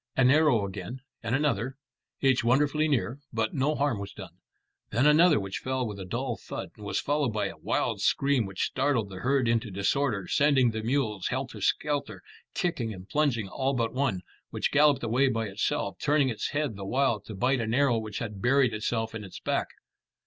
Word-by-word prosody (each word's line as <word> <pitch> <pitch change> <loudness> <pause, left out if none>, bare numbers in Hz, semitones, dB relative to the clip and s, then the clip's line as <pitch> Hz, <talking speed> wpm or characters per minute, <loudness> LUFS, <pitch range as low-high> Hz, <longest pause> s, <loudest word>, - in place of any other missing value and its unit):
An 130 -1 +5
arrow 145 -8 +4
again, 100 +6 -7 0.2
and 115 +1 -1
another, 135 -3 0 0.4
each 130 -3 +3
wonderfully 145 +5 +2
near, 135 -2 0
but 110 -1 -1
no 145 +3 +1
harm 140 -7 0
was 100 0 -7
done. - - -10 0.6
Then 120 +6 +1
another 155 +1 +6
which 95 -1 -4
fell 130 -1 -2
with 105 -3 -6
a 95 - -6
dull 120 +5 -3
thud, - - -6
and 105 - -13
was - - 0
followed 145 -3 0
by 105 - 0
a - - -11
wild - - -1
scream 135 -6 +2
which 95 -1 -3
startled 130 -6 0
the 95 - -7
herd 130 +2 +1
into 115 -1 +1
disorder, 100 +1 0
sending 140 -5 +3
the 110 0 -4
mules 110 -5 -1
helter - - -4
skelter, 140 -10 -1 0.3
kicking 125 -11 -1
and 95 -2 -9
plunging, 135 -9 +1
all 135 +6 -1
but 115 -2 -1
one, 130 -8 0 0.3
which - - -1
galloped 150 -2 +4
away 120 +4 +2
by 115 -2 -1
itself, 105 +9 -2
turning 145 -2 +3
its 115 - -2
head 145 -6 -1
the 100 - -6
while 130 -2 +1
to 105 +2 -10
bite 130 +7 +1
at 115 - -1
an 110 - 0
arrow 135 -4 +3
which 110 -2 -6
had 105 -4 -5
buried 130 0 +3
itself 110 +1 -2
in 115 -1 -6
its 95 -3 -9
back. - - -1
125 Hz, 200 wpm, -28 LUFS, 110-140 Hz, 0.6 s, another